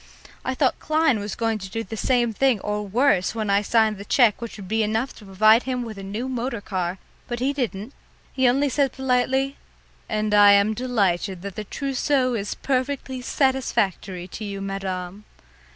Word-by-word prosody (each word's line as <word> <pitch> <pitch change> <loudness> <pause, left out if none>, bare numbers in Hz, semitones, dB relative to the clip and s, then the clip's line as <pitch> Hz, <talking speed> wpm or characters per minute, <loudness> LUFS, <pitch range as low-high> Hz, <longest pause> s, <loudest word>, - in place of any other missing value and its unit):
I 260 - -2
thought 260 -1 +1
Klein 310 -6 +2
was 205 0 -5
going 225 -1 -1
to 190 -1 -7
do 225 +3 -3
the 225 - -7
same 240 0 +1
thing 260 -1 +2
or 210 0 -2
worse 230 -2 +2
when 215 -3 -1
I 200 +1 +4
signed 215 -1 +2
the - - -6
cheque 230 -1 +3
which 235 -1 -6
would 195 -3 -9
be 220 +3 +1
enough 220 +4 -1
to 210 - -13
provide 215 +4 +5
him 250 -1 -1
with 220 -4 -7
a - - -6
new 205 +6 -4
motor 250 -2 -3
car, 185 -3 -3 0.3
but 240 -1 -4
he 270 +3 0
didn't. 240 -3 -3 0.4
He 260 -1 +3
only 275 +4 +2
said 275 -1 +1
politely, 265 +1 0 0.5
"And 215 -1 -1
I 205 -1 +8
am 200 +2 +4
delighted 200 -6 -1
that 200 -2 -6
the 215 - -5
trousseau 270 +1 0
is 205 -3 -3
perfectly 260 -1 -2
satisfactory 215 - 0
to 215 - -7
you, 200 -1 -5
madame." 195 0 -4
225 Hz, 185 wpm, -23 LUFS, 200-255 Hz, 0.5 s, I